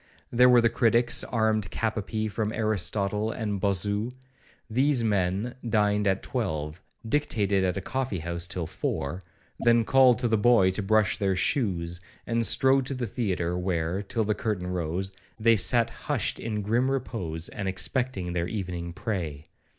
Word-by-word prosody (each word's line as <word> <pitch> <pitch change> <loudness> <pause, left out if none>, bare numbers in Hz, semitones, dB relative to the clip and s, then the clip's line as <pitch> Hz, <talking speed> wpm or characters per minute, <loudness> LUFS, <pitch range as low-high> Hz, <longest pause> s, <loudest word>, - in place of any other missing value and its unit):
There 125 +1 +6
were 125 -1 +6
the 115 - +4
critics 120 0 +3
armed 110 -4 0
cap 115 -1 -2
a 110 - -1
pee 110 +2 -3
from 105 +1 -2
Aristotle 105 0 0
and 105 -4 -3
Bossu; 100 +4 0 0.6
these 130 +2 +2
men 100 +2 0 0.2
dined 105 -2 +2
at 95 -1 +1
twelve, 80 - -3 0.3
dictated 105 -8 +1
at 95 +1 0
a - - -2
coffee 130 -1 -2
house 85 +1 -2
till 85 0 -3
four, 80 +1 -3 0.4
then 115 -1 +4
called 130 -2 +5
to 120 - 0
the 110 -2 +2
boy 105 -4 +5
to 95 - -2
brush 110 0 +2
their 95 -2 +1
shoes, 90 -4 -1 0.2
and 115 -1 +1
strode 130 +3 +3
to 135 - -3
the 125 -1 -2
theatre, 95 -6 -2
where, 90 0 -1
till 110 +3 -2
the 105 0 +1
curtain 105 -5 -3
rose, 90 +1 -3 0.3
they 115 +1 +5
sat 115 +3 +3
hushed - - -2
in 105 -2 -3
grim 120 +6 +1
repose, 90 -11 -3
and 100 - -5
expecting 95 -1 -2
their 85 -1 -1
evening 90 -4 -4
prey. 80 -9 -4
105 Hz, 165 wpm, -27 LUFS, 90-115 Hz, 0.6 s, There